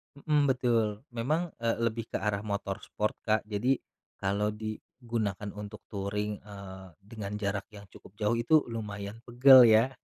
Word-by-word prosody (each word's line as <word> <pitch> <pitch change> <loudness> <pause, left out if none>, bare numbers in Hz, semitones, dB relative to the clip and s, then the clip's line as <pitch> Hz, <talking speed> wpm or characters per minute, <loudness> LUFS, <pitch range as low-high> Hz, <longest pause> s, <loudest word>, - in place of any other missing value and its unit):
Mhm, 145 0 +2
betul 115 -5 +1
memang, 150 +9 -1
eee, 115 0 0
lebih 115 -1 -1
ke - - -4
arah 105 0 -1
motor 100 -1 -2
sport, 105 0 -2
Kak, 110 0 +2
jadi, 110 +6 +2 0.5
kalau 105 +2 0
digunakan 110 -1 -4
untuk 105 +1 -8
touring, 105 +1 -3
eee, 100 -2 -10
dengan 105 -1 -7
jarak 100 -1 -2
yang 100 -1 -12
cukup 95 - -16
jauh 105 +2 0
itu 150 +7 +4
lumayan 105 -2 -5
pegel 125 +1 +8
ya 110 +2 +5
105 Hz, 150 wpm, -29 LUFS, 100-115 Hz, 0.5 s, pegel